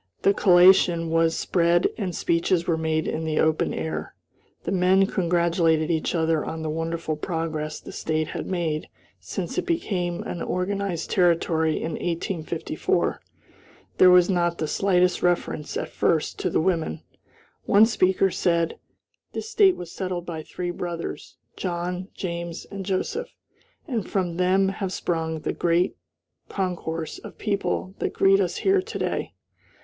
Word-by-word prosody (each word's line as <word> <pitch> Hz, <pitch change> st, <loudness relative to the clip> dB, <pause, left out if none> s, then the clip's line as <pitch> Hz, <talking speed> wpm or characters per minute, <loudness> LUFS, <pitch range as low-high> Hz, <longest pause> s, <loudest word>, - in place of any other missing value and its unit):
The 200 Hz, -, +5 dB
collation 175 Hz, -3 st, +5 dB
was 165 Hz, 0 st, +2 dB
spread 175 Hz, 0 st, +2 dB
and 190 Hz, -5 st, -3 dB
speeches 170 Hz, +1 st, +1 dB
were 165 Hz, -, +1 dB
made 160 Hz, 0 st, -1 dB
in 160 Hz, -, -2 dB
the 155 Hz, -1 st, -1 dB
open 160 Hz, 0 st, +2 dB
air. 80 Hz, -1 st, -4 dB, 0.5 s
The 170 Hz, -, -3 dB
men 190 Hz, +1 st, +4 dB
congratulated 170 Hz, -3 st, +1 dB
each 160 Hz, +2 st, 0 dB
other 160 Hz, -2 st, +1 dB
on 160 Hz, 0 st, -5 dB
the 155 Hz, -, -2 dB
wonderful 165 Hz, 0 st, -2 dB
progress 155 Hz, -2 st, -3 dB
the -, -, -10 dB
State 155 Hz, 0 st, -2 dB
had -, -, -5 dB
made 165 Hz, -4 st, -2 dB, 0.3 s
since -, -, -4 dB
it -, -, -5 dB
became 185 Hz, -, -1 dB
an 175 Hz, -, -5 dB
organized 185 Hz, -2 st, -2 dB
Territory 165 Hz, -3 st, +2 dB
in 165 Hz, -, -3 dB
1854. 170 Hz, 0 st, -2 dB, 0.8 s
There 185 Hz, -, +8 dB
was 180 Hz, -1 st, +7 dB
not 175 Hz, -2 st, +1 dB
the 155 Hz, -, -2 dB
slightest 180 Hz, +1 st, +2 dB
reference, 175 Hz, -4 st, 0 dB
at -, -, -3 dB
first, 160 Hz, -2 st, 0 dB
to 180 Hz, -, 0 dB
the -, -, +1 dB
women. 165 Hz, -, -1 dB, 0.6 s
One 205 Hz, +2 st, +6 dB
speaker 190 Hz, -3 st, +2 dB
said: 170 Hz, -2 st, 0 dB, 0.5 s
"This 440 Hz, -, -5 dB
State 400 Hz, -4 st, +5 dB
was 175 Hz, -1 st, -8 dB
settled 185 Hz, -2 st, -4 dB
by 165 Hz, -3 st, -5 dB
three 175 Hz, +3 st, -4 dB
brothers, 175 Hz, -1 st, -6 dB, 0.2 s
John, 180 Hz, 0 st, -3 dB
James, 170 Hz, -2 st, -5 dB
and 200 Hz, -1 st, -5 dB
Joseph, 195 Hz, -, -2 dB, 0.5 s
and 235 Hz, -8 st, -3 dB
from 180 Hz, -4 st, -1 dB
them 190 Hz, +1 st, +3 dB
have 195 Hz, -1 st, -3 dB
sprung 160 Hz, -3 st, -2 dB
the -, -, -2 dB
great 175 Hz, +1 st, +1 dB, 0.5 s
concourse 165 Hz, -4 st, -3 dB
of -, -, -11 dB
people 200 Hz, -2 st, -2 dB
that -, -, -2 dB
greet 195 Hz, 0 st, +4 dB
us 180 Hz, -3 st, 0 dB
here 390 Hz, 0 st, +4 dB
to -, -, -6 dB
day." -, -, -2 dB
175 Hz, 150 wpm, -25 LUFS, 165-185 Hz, 0.8 s, There